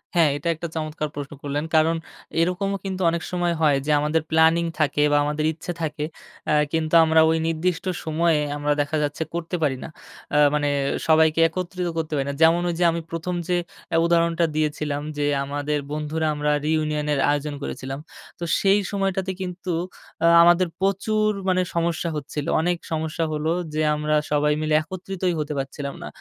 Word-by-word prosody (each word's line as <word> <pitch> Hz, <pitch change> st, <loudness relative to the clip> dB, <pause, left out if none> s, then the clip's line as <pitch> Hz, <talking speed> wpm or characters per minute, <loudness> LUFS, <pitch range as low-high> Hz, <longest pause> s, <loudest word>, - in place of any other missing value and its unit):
হ্যাঁ, 165 Hz, -3 st, +5 dB
এটা 145 Hz, -, -5 dB
একটা 170 Hz, +2 st, -5 dB
চমৎকার 155 Hz, -1 st, -3 dB
প্রশ্ন 145 Hz, 0 st, -6 dB
করলেন। 145 Hz, +1 st, -2 dB
কারণ 160 Hz, +1 st, +4 dB, 0.5 s
এরকমও 195 Hz, +3 st, 0 dB
কিন্তু 190 Hz, -1 st, -3 dB
অনেক 170 Hz, 0 st, -1 dB
সময় 175 Hz, -1 st, 0 dB
হয় 145 Hz, -3 st, +4 dB
যে, 150 Hz, -, +1 dB
আমাদের 150 Hz, +2 st, +1 dB
প্ল্যানিং 160 Hz, +1 st, +4 dB
থাকে 145 Hz, -1 st, +2 dB
বা 145 Hz, -, +4 dB
আমাদের 150 Hz, +1 st, -1 dB
ইচ্ছা 165 Hz, +2 st, -6 dB
থাকে। 150 Hz, -1 st, -2 dB, 0.5 s
আ -, -, +4 dB, 0.2 s
কিন্তু 160 Hz, 0 st, -1 dB
আমরা 160 Hz, 0 st, +5 dB
ওই 160 Hz, -, +2 dB
নির্দিষ্ট 165 Hz, +2 st, -1 dB, 0.2 s
সময়ে 160 Hz, 0 st, +2 dB, 0.2 s
আমরা 145 Hz, 0 st, 0 dB
দেখা 145 Hz, +2 st, -1 dB
যাচ্ছে 145 Hz, +2 st, -2 dB
করতে 170 Hz, +1 st, -3 dB
পারি 135 Hz, -3 st, +1 dB
না। -, -, -7 dB, 0.5 s
আ -, -, +5 dB, 0.2 s
মানে 145 Hz, -1 st, +1 dB, 0.4 s
সবাইকে 160 Hz, 0 st, +4 dB
একত্রিত 180 Hz, +1 st, -4 dB
করতে 160 Hz, -1 st, -2 dB
পারি 135 Hz, -2 st, 0 dB
না। -, -, -2 dB
যেমন 165 Hz, +2 st, +5 dB
ওই -, -, -1 dB
যে, -, -, +3 dB
আমি 170 Hz, 0 st, -3 dB
প্রথম 165 Hz, +2 st, -3 dB
যে, 180 Hz, -1 st, +2 dB, 0.3 s
অ্যা 165 Hz, -, +1 dB
উদাহরণটা 170 Hz, 0 st, +2 dB
দিয়েছিলাম 150 Hz, -1 st, -1 dB, 0.2 s
যে 145 Hz, -, 0 dB, 0.2 s
আমাদের 145 Hz, +1 st, -2 dB
বন্ধুরা 155 Hz, +1 st, -2 dB
আমরা 150 Hz, 0 st, 0 dB, 0.2 s
রিইউনিয়নের 150 Hz, -2 st, 0 dB
আয়োজন 145 Hz, 0 st, -1 dB
করেছিলাম। 135 Hz, 0 st, -5 dB, 0.4 s
তো -, -, -5 dB, 0.2 s
সেই 195 Hz, +1 st, +4 dB
সময়টাতে 195 Hz, -1 st, -1 dB
কিন্তু 180 Hz, -1 st, -4 dB, 0.5 s
আ -, -, +6 dB, 0.2 s
আমাদের 175 Hz, +1 st, +5 dB
প্রচুর 215 Hz, +2 st, +1 dB, 0.2 s
মানে 185 Hz, 0 st, +3 dB
সমস্যা 170 Hz, 0 st, 0 dB
হচ্ছিল। 145 Hz, 0 st, -4 dB, 0.2 s
অনেক 175 Hz, +1 st, +1 dB
সমস্যা 160 Hz, +1 st, -2 dB
হলো 155 Hz, +1 st, -1 dB, 0.2 s
যে, 155 Hz, -, 0 dB
আমরা 150 Hz, 0 st, 0 dB, 0.2 s
সবাই 150 Hz, 0 st, +3 dB
মিলে 155 Hz, 0 st, 0 dB
একত্রিতই 185 Hz, +2 st, -3 dB
হতে 150 Hz, 0 st, -2 dB
পারছিলাম 140 Hz, +1 st, -4 dB
না। -, -, -6 dB
160 Hz, 175 wpm, -23 LUFS, 150-175 Hz, 0.5 s, আ